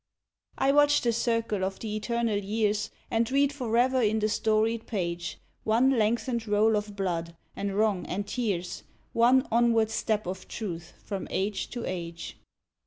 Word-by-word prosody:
I 270 - +3
watch 290 0 +5
the 235 -1 +1
circle 230 -4 0
of 190 0 -2
the 215 -2 -4
eternal 230 -1 0
years, 210 +1 0 0.2
And 230 -1 +1
read 280 +1 +3
forever 255 0 +2
in 220 -1 +2
the 215 0 +1
storied 220 +1 +1
page 175 -5 -3 0.3
One 235 +5 +3
lengthened 235 0 0
roll 210 +1 +3
of 205 -1 -3
blood, 170 -4 -2 0.2
and 200 -1 -3
wrong, 210 -4 +1
and 200 +3 -2
tears, 195 -7 -2 0.3
One 250 +3 +4
onward 230 -1 +3
step 215 -2 0
of 185 +2 -5
Truth 175 -6 -6
from 200 -2 -4
age 195 +2 -2
to 240 -1 -5
age. 170 -2 -5
220 Hz, 155 wpm, -28 LUFS, 200-235 Hz, 0.3 s, watch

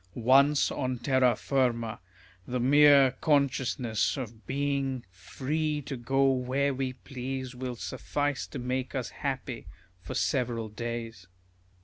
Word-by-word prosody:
Once 135 +5 +4
on 130 -2 -2
terra 130 -1 +3
firma, 120 -5 0 0.5
the 125 0 -2
mere 140 +1 +6
consciousness 135 -5 +1
of 115 -4 -7
being 135 -2 -1
free 150 - -2
to 140 -1 -6
go 135 +2 +2
where 135 +2 0
we 130 -1 -2
please 130 0 -6
will 125 0 -5
suffice 145 +4 -2
to - - -7
make 130 +1 -3
us 130 -3 -3
happy 130 -3 -4 0.3
for 90 - -7
several 120 -5 0
days. 115 -3 -6
130 Hz, 120 wpm, -29 LUFS, 120-140 Hz, 0.5 s, mere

